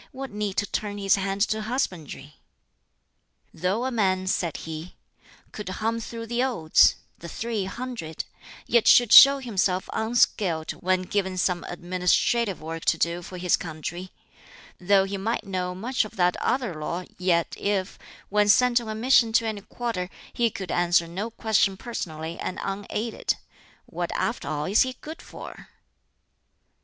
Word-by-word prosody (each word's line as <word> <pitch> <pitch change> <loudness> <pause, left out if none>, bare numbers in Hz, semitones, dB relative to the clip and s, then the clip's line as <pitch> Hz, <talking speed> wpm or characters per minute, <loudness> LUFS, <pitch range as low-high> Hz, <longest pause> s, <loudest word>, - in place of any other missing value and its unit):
What 265 0 -7
need 205 -2 -3
to 205 - +2
turn 205 0 -3
his 195 -1 +3
hand 195 0 -2
to 215 0 +1
husbandry? 180 - -4 1.2
"Though 190 +8 -1
a 260 - -1
man," 190 -5 +1
said 175 -3 -1
he, 160 +2 -7 0.6
"could 210 -3 -6
hum 225 +5 -2
through 230 0 -6
the 235 +2 -1
Odes 165 -12 +4 0.2
the 170 - -8
three 220 +1 -3
hundred 220 -7 -5 0.4
yet 235 -1 +3
should 240 -3 +6
show 275 +1 +11
himself 195 -7 -1
unskilled 205 -7 +1
when 185 0 0
given 190 -1 -2
some 180 -1 0
administrative 180 +4 0
work 165 +1 -5
to - - +3
do 170 +1 0
for 180 +1 -9
his 180 -1 +2
country; 175 +3 -6 0.7
though 195 +1 +4
he 195 +1 -4
might 220 +3 -2
know 180 -2 -3
much 245 +8 0
of 215 - -10
that 180 -1 +2
other 250 -7 -1
lore, 170 +4 -4
yet 175 -2 +1
if, 200 -2 -2 0.3
when 210 0 +2
sent 245 +2 +5
on 225 - -7
a 215 - -3
mission 235 0 +4
to 230 - +3
any 215 -2 -3
quarter, 205 -4 -4 0.2
he 235 -1 +2
could 190 -3 -6
answer 175 -1 +2
no 190 +7 -4
question 215 -4 +1
personally 165 -8 -5
and 185 - -4
unaided, 205 +3 -2 0.5
what - - -4
after - - -2
all 150 0 -2
is 200 +3 +3
he 260 0 +1
good 315 +2 -8
for? - - -11
195 Hz, 155 wpm, -25 LUFS, 180-230 Hz, 1.2 s, show